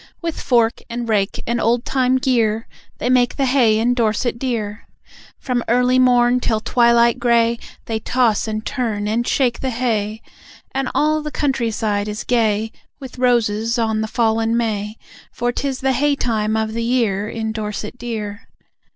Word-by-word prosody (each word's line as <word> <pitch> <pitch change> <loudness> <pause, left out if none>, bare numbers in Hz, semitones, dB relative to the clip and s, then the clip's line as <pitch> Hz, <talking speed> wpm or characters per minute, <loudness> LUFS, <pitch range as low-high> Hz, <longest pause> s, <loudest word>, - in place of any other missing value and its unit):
With 335 -2 -4
fork 235 -2 +2
and 235 0 -4
rake 205 -3 0
and 235 0 -1
old 235 +2 +1
time 260 -1 +2
gear 230 -5 +1 0.3
They - - -3
make 250 -1 +3
the 275 - +1
hay 250 -5 +3
in 235 +3 +2
Dorset 235 0 0
Dear. 225 -5 -3 0.5
From 250 -2 -2
early 250 +2 +3
morn 245 -1 +4
till 220 -3 0
twilight 235 +1 +3
grey 235 -1 +2 0.3
They 225 -1 -2
toss 230 -2 +1
and 215 0 -4
turn 220 -5 -2
and 230 +3 -1
shake 250 -4 +1
the 265 - -2
hay. 225 -3 -2 0.5
And 270 -1 -2
all 310 +1 +2
the 300 - -4
countryside 225 -8 -1
is 210 0 -4
gay 220 -2 +1 0.3
With 260 -2 -10
roses 230 -2 +1
on 220 -2 0
the 220 - -2
fallen 225 0 +1
may, 215 -2 -2 0.3
For 240 0 -1
'tis 265 +1 -3
the 265 0 +2
hay 285 +3 +2
time 220 -4 -1
of 220 0 -1
the 230 - -2
year 225 -4 0
In 220 -1 -3
Dorset 215 +2 -5
Dear. 215 -3 -5
235 Hz, 165 wpm, -19 LUFS, 220-250 Hz, 0.5 s, morn